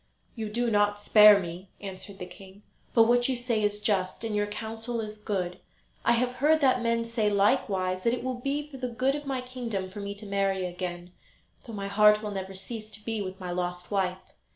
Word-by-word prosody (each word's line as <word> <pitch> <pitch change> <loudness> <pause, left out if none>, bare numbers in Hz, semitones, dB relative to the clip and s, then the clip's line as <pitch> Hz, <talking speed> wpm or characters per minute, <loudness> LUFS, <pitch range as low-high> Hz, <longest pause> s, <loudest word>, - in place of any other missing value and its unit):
"You 220 -3 -4
do 235 +2 0
not 205 0 +2
spare 210 0 +8
me," 180 +1 -7
answered 195 0 -8
the 180 - -6
king; 190 +2 -14 0.3
"but 230 - +8
what 245 +2 +3
you 260 - +1
say 240 -3 0
is 210 0 0
just, 200 -2 0
and 220 -2 -2
your 205 0 +1
counsel 225 +3 -4
is 215 -1 -5
good. 185 -4 -3 0.4
I 235 - +4
have 250 +1 0
heard 310 +4 +4
that 255 -3 +4
men 230 0 +1
say, 230 -2 0
likewise, 195 -3 +1
that 230 - +2
it 245 - -7
will 255 -1 -3
be 285 +3 -2
for 285 -2 -10
the 250 -1 -3
good 255 +3 +1
of 295 0 -5
my 265 -2 -1
kingdom 235 -7 -4
for 205 - -8
me 200 0 -5
to 205 +1 -10
marry 195 -2 0
again, 175 0 -5 0.6
though 230 - -7
my 200 -1 -4
heart 210 +1 +5
will 210 - -3
never 190 -1 -5
cease 215 +3 -7
to 210 0 -9
be 225 -2 -2
with 190 -1 -6
my 180 -1 -5
lost 180 +1 -3
wife. 190 -2 -2
210 Hz, 220 wpm, -28 LUFS, 195-235 Hz, 0.6 s, spare